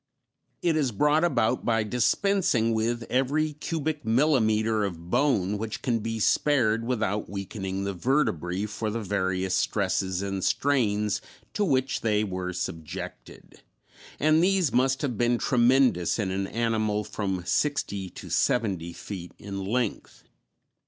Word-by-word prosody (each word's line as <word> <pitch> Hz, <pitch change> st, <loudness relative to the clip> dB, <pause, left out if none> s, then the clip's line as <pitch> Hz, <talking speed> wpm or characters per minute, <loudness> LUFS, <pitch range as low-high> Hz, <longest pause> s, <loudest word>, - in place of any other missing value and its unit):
It 170 Hz, -2 st, +2 dB
is 145 Hz, -5 st, +1 dB
brought 150 Hz, +9 st, +2 dB
about 130 Hz, -8 st, +1 dB
by 115 Hz, -2 st, +1 dB
dispensing 125 Hz, -, +1 dB
with 115 Hz, +2 st, 0 dB
every 140 Hz, +6 st, 0 dB
cubic 155 Hz, 0 st, -3 dB
millimeter 110 Hz, -4 st, +2 dB
of 85 Hz, -3 st, -5 dB
bone 105 Hz, -7 st, +2 dB
which 110 Hz, 0 st, -5 dB
can 120 Hz, -4 st, +1 dB
be 115 Hz, +1 st, -3 dB
spared 115 Hz, -2 st, +2 dB
without 105 Hz, -4 st, -1 dB
weakening 95 Hz, -1 st, -4 dB
the 100 Hz, 0 st, -2 dB
vertebræ 95 Hz, -, 0 dB
for 105 Hz, +1 st, -3 dB
the 115 Hz, +2 st, -3 dB
various 95 Hz, -1 st, -1 dB
stresses 95 Hz, +1 st, 0 dB
and 95 Hz, -1 st, -3 dB
strains 105 Hz, -7 st, +1 dB, 0.3 s
to 210 Hz, -, 0 dB
which 135 Hz, -7 st, +1 dB
they 105 Hz, -2 st, +1 dB
were 90 Hz, -2 st, -3 dB
subjected, 80 Hz, -3 st, -7 dB, 0.6 s
and 155 Hz, +2 st, +4 dB
these 185 Hz, -7 st, +2 dB
must 130 Hz, +2 st, +2 dB
have 125 Hz, -7 st, -2 dB
been 120 Hz, 0 st, +3 dB
tremendous 125 Hz, -7 st, +3 dB
in 100 Hz, -4 st, -1 dB
an 95 Hz, +1 st, -2 dB
animal 110 Hz, -2 st, 0 dB
from 95 Hz, -4 st, -3 dB
sixty 100 Hz, -10 st, -1 dB
to -, -, -10 dB
seventy 95 Hz, -8 st, 0 dB
feet 90 Hz, -1 st, -8 dB
in 100 Hz, -1 st, -6 dB
length. 115 Hz, +2 st, -3 dB
110 Hz, 135 wpm, -27 LUFS, 100-130 Hz, 0.6 s, and